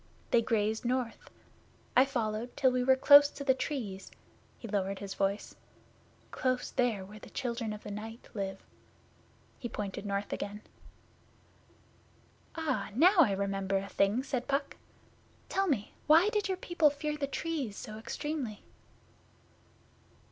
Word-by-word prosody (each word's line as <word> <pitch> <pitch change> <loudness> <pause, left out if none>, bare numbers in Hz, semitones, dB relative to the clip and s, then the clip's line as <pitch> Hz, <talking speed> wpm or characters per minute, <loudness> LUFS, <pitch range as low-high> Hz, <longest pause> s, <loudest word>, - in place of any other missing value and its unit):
They 235 - +5
grazed 220 -1 0
north. 250 -1 -2 0.7
I 255 - +7
followed 235 -3 -3
till 260 -2 +4
we 250 0 +1
were 265 +1 +5
close 285 +2 +8
to 285 - -8
the 270 -1 +4
Trees' 255 -8 -4 0.5
he 230 - -8
lowered 195 -2 -1
his 195 0 -6
voice 195 +1 -1 0.8
'close 255 -1 -1
there 235 -7 0
where 210 +2 -11
the - - -12
Children 235 -4 -3
of 210 0 -7
the 210 - -7
Night 225 +3 -7
live.' 195 -3 -4 1.0
He 240 - -4
pointed 205 -1 -5
north 200 0 -2
again. 205 +1 -5 1.9
'Ah, 270 -11 -1
now 360 - +6
I 245 -12 +6
remember 195 0 -1
a 195 +1 -3
thing,' 205 +6 +2
said 260 -3 -3
Puck. 280 0 -1 0.7
'Tell 390 0 +1
me, 240 - -1
why 325 +7 +7
did 420 -3 0
your 380 -1 -1
people 345 -4 +3
fear 300 +1 -3
the 290 -2 -2
Trees 280 -8 -3
so 215 0 -7
extremely? 260 -2 -4
240 Hz, 140 wpm, -31 LUFS, 205-280 Hz, 1.9 s, close